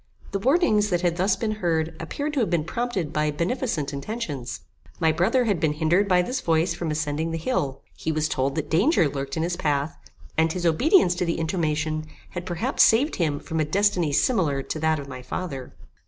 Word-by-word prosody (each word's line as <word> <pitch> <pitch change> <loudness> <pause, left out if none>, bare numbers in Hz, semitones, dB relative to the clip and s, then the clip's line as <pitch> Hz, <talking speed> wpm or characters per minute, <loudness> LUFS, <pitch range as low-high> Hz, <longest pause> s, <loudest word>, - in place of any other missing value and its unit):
The 195 - -1
warnings 220 - +3
that 175 -2 +1
had 175 -1 +1
thus 190 +2 +2
been 220 -2 -2
heard 160 -2 0
appeared 285 - -4
to 290 - 0
have 230 - +1
been 170 -3 +1
prompted 190 -4 -2
by 150 0 +1
beneficent 170 - -2
intentions. 140 - -5 0.4
My 160 - +4
brother 180 +11 +2
had 205 -6 +1
been 155 -2 +1
hindered 170 +6 +2
by 180 -2 +4
this 255 +7 -3
voice 165 +1 +2
from 170 -1 -4
ascending 155 +1 -1
the 165 - -2
hill. 140 - -2
He 160 - -2
was 155 0 0
told 135 -1 -1
that 155 - -2
danger 185 - +4
lurked 140 0 -4
in 160 - 0
his 175 +1 -1
path, 145 -2 -1 0.4
and 160 0 +3
his 180 -1 -3
obedience 180 - +4
to 180 - 0
the 170 - -1
intimation 155 -2 -1 0.2
had 175 0 -6
perhaps 180 +10 0
saved 260 +8 +4
him 150 -5 0
from 160 - -4
a - - +3
destiny 180 0 +1
similar 145 - +1
to 155 - -4
that 160 0 +2
of 140 -1 -7
my 130 -2 -7
father. 135 0 -5
165 Hz, 205 wpm, -25 LUFS, 150-195 Hz, 0.4 s, My